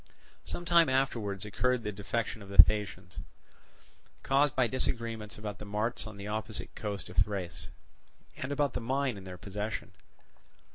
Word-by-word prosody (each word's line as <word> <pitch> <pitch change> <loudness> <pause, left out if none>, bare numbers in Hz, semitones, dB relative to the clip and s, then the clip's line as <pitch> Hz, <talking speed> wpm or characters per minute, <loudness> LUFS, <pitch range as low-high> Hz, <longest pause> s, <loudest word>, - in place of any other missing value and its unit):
Some 175 - -5
time 170 -3 +6
afterwards 115 -7 0
occurred 125 +4 +1
the 105 - -2
defection 105 +2 -3
of 100 - -11
the 100 - -6
Thasians, 95 -1 +5 1.0
caused 140 +1 +3
by 130 - +4
disagreements 115 -3 -2
about 105 -1 -6
the - - -7
marts 105 +2 -1
on 110 -2 -9
the 100 - -7
opposite 110 +1 -3
coast 105 -3 -4
of - - -11
Thrace, 85 -5 0 0.7
and 130 - -4
about 145 -1 +1
the - - -2
mine 130 +1 0
in 95 -1 -9
their 90 -1 -7
possession. 105 +4 -4
105 Hz, 155 wpm, -31 LUFS, 100-125 Hz, 1.0 s, time